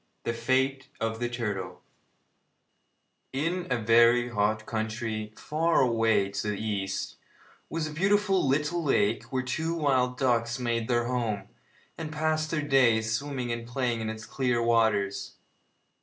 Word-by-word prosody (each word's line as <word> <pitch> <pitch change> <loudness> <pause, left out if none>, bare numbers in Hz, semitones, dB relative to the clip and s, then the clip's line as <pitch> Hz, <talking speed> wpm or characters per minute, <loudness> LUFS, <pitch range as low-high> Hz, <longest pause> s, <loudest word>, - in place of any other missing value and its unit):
THE 115 - -1
FATE 130 +3 0
OF 115 0 -2
THE 120 0 -1
TURTLE 110 -5 -4 1.5
In 165 +6 -1
a 125 - +1
very 120 +2 +4
hot 110 0 0
country, 110 -1 -3
far 165 +2 +1
away 115 -5 +2
to 105 - -3
the 105 - 0
east, 100 -3 -3 0.5
was 165 -1 -2
a 155 - -5
beautiful 195 0 +2
little 150 +5 +1
lake 180 +8 +1
where 130 -2 -2
two 160 +6 -2
wild 130 -5 +1
ducks 120 -2 +1
made 120 -2 -1
their 120 -1 +1
home, 110 -5 -2 0.5
and 155 -2 -5
passed 155 0 0
their 155 -2 -1
days 115 -5 +3
swimming 130 -1 -2
and 115 0 -4
playing 120 -2 -1
in 110 - -2
its 110 -1 -6
clear 125 +1 0
waters. 105 -4 +1
120 Hz, 140 wpm, -28 LUFS, 110-140 Hz, 1.5 s, very